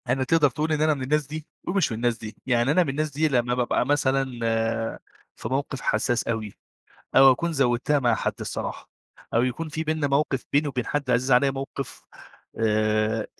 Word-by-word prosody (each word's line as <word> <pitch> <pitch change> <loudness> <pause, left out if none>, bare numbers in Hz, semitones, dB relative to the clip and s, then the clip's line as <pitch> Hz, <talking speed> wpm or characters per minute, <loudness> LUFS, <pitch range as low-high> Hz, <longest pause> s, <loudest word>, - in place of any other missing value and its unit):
أنا 130 +2 +1
تقدر 150 +1 +3
تقول 155 +4 -2
إن 155 -1 +1
أنا 155 0 +4
من 135 -3 -5
الناس 150 +1 0
دي، 155 +1 -6 0.2
ومش 180 -6 +1
من - - -2
الناس 120 0 0
دي، 110 -1 -8
يعني 120 +1 +2
أنا 180 +4 +4
من 155 - -4
الناس 155 +3 -1
دي 155 +3 +1
لمّا 125 -4 +1
بابقى 125 0 +1
مثلًا 135 -1 +2 1.1
في - - -6
موقف 135 0 -2
حساس 120 +2 0
أوي. 110 -3 -3 0.6
أو 135 0 +9
أكون 170 +6 -2
زوّدتها 135 0 +2
مع 120 -4 +2
حد - - -1
الصراحة، - - -5 0.4
أو 115 - +4
يكون 130 +6 -2
في 160 +1 -4
بيننا 155 -1 0
موقف 140 -2 0
بيني 145 +1 +2
وبين 125 -4 -3
حدّ 145 -3 -2
عزيز 125 +2 +2
عليَّ 135 +3 +5
موقف 135 -1 -6 0.6
آآ، 110 0 +1
135 Hz, 190 wpm, -25 LUFS, 120-150 Hz, 1.1 s, أو